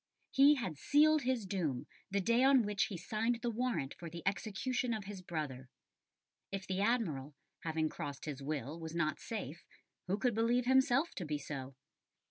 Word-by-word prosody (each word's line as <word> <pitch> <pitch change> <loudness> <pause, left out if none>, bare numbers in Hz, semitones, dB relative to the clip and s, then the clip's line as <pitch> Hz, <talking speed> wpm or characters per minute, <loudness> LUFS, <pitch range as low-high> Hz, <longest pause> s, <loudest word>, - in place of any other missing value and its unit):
He 280 +2 +7
"had 185 - -4
sealed 305 +1 +5
his 250 -4 0
doom 170 -10 -1 0.2
the 200 +1 +1
day 235 +6 +3
on 270 -2 +6
which 205 -1 +1
he 195 - -5
signed 225 +7 -1
the 240 - +1
warrant 230 - -1
for 170 - -8
the 170 0 -8
execution 230 +5 -1
of 215 - -5
his 195 -1 -7
brother." 145 -7 -4 0.8
If 195 -1 -4
the 190 0 -1
Admiral, 165 - 0 0.2
having 160 -1 0
crossed 145 -2 -6
his 145 -3 -5
will, 150 +2 -3
was 160 0 -6
not 155 -2 0
safe, 175 - -5 0.4
who 190 +3 +1
could 245 +2 +1
believe 235 +3 +2
himself 265 +4 +4
to 185 - -2
be 150 -2 -2
so? 135 -2 -6
195 Hz, 175 wpm, -35 LUFS, 155-240 Hz, 0.8 s, He